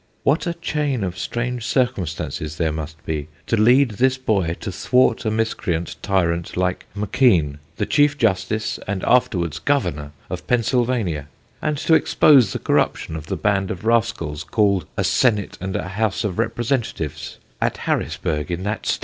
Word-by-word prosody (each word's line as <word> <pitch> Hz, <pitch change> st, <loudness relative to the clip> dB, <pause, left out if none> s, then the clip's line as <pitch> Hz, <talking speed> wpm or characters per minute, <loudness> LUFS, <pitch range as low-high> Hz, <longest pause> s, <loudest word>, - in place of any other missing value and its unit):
What 150 Hz, +6 st, +2 dB
a 170 Hz, -, -1 dB
chain 150 Hz, -8 st, -1 dB
of 90 Hz, -1 st, -3 dB
strange 120 Hz, +4 st, -3 dB
circumstances 85 Hz, -, -1 dB
there 80 Hz, -1 st, +1 dB
must 80 Hz, +1 st, -7 dB
be 75 Hz, -2 st, -3 dB, 0.2 s
to -, -, +1 dB
lead 120 Hz, +4 st, +5 dB
this 130 Hz, +5 st, +2 dB
boy 100 Hz, -10 st, 0 dB
to 100 Hz, -, -4 dB
thwart 125 Hz, +7 st, +2 dB
a -, -, +2 dB
miscreant 105 Hz, -6 st, -1 dB
tyrant 85 Hz, -4 st, 0 dB
like 90 Hz, 0 st, -1 dB
M'keen, 95 Hz, -, +2 dB, 0.2 s
the -, -, -1 dB
Chief 145 Hz, 0 st, +3 dB
Justice, 105 Hz, -2 st, 0 dB
and 95 Hz, -1 st, -2 dB
afterwards 95 Hz, -, +2 dB
Governor, 75 Hz, -, -1 dB, 0.2 s
of -, -, -6 dB
Pennsylvania, 115 Hz, -, 0 dB, 0.3 s
and 150 Hz, -, -1 dB
to 160 Hz, +3 st, +1 dB
expose 140 Hz, -, +5 dB
the -, -, -2 dB
corruptions 80 Hz, -, 0 dB
of 75 Hz, -1 st, -9 dB
the -, -, -2 dB
band 100 Hz, -2 st, +1 dB
of 95 Hz, +4 st, -5 dB
rascals, 115 Hz, -10 st, 0 dB
called 100 Hz, -1 st, +1 dB
a 100 Hz, -, +1 dB
'Senate 105 Hz, +2 st, +1 dB
and 95 Hz, 0 st, -3 dB
a 95 Hz, -, -3 dB
House 105 Hz, +2 st, -1 dB
of 105 Hz, -2 st, -3 dB
Representatives,' 115 Hz, -, -2 dB, 0.2 s
at -, -, 0 dB
Harrisburgh, 75 Hz, -2 st, -2 dB
in 90 Hz, +1 st, -3 dB
that 105 Hz, +2 st, -3 dB
state!" -, -, +1 dB
105 Hz, 160 wpm, -21 LUFS, 85-125 Hz, 0.3 s, lead